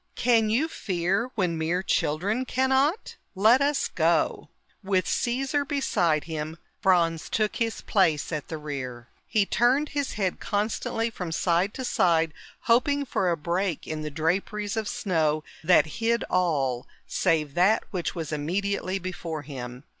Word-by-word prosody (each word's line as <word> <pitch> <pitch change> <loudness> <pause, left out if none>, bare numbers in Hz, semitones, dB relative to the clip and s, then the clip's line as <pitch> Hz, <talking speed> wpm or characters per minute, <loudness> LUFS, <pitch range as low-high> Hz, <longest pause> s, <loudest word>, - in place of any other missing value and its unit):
"Can 230 -3 +3
you 250 +9 +2
fear 195 - -1
when 175 -6 0
mere 170 +4 0
children 195 +10 0
cannot? 265 - +1 0.2
Let 220 +7 +5
us 285 0 +1
go." - - +1 0.3
With 190 -2 +1
Caesar 270 +4 0
beside 180 - +1
him, 160 0 -5 0.2
Franz 170 -5 +2
took 215 -1 0
his 225 -1 -1
place 165 -8 +1
at 155 -3 -3
the 160 - -5
rear. 130 -5 -6 0.2
He 215 -3 +2
turned 255 +8 +2
his 285 -2 -2
head 190 -4 -1
constantly 220 +2 -1
from 180 -6 -5
side 175 +4 +1
to 260 - -4
side, 165 -8 +2 0.3
hoping 280 +5 +2
for 190 -7 0
a 170 - +1
break 170 +2 -1
in 155 -1 -4
the 155 - -3
draperies 190 +7 -1
of 220 -2 -2
snow 160 -10 0 0.2
that 160 -2 +5 0.2
hid 235 +1 +2
all 140 -9 +1 0.2
save 155 -5 0
that 190 +7 +3
which 180 -3 -3
was 160 -3 -4
immediately 185 +5 -1
before 170 -4 -5
him. 125 -2 -7
185 Hz, 145 wpm, -26 LUFS, 160-225 Hz, 0.3 s, Let